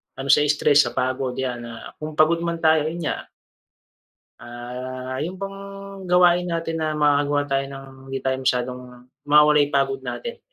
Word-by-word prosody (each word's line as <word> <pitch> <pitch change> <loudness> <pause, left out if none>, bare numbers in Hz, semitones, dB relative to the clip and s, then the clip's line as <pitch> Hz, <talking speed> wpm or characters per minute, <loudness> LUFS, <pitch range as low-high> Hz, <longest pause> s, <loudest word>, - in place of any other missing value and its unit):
ano 135 - -6
sa 150 - +6
stress 150 0 +4
sa - - -4
pagod 130 0 -1
yan 125 -2 -4
na 115 -1 -9
kung 155 0 -6
pagod 155 +2 +4
man 170 -1 -3
tayo, 160 -1 +4
yun 165 +2 -4
nga 150 - -3 1.2
ah, 125 +2 -6
yung 165 +6 -3
bang 195 +1 -6 0.5
gawain 180 0 +4
natin 165 -1 -2
na 155 -1 -1
makakagawa 145 -1 +2
tayo 135 0 +1
ng 135 0 -9 0.2
hindi 135 0 -4
tayo 130 0 0
masyadong 125 -1 -1 0.5
mawawala 150 0 +6
yung 145 - -9
pagod 405 0 +1
natin. 480 -1 -6
145 Hz, 165 wpm, -23 LUFS, 130-165 Hz, 1.2 s, sa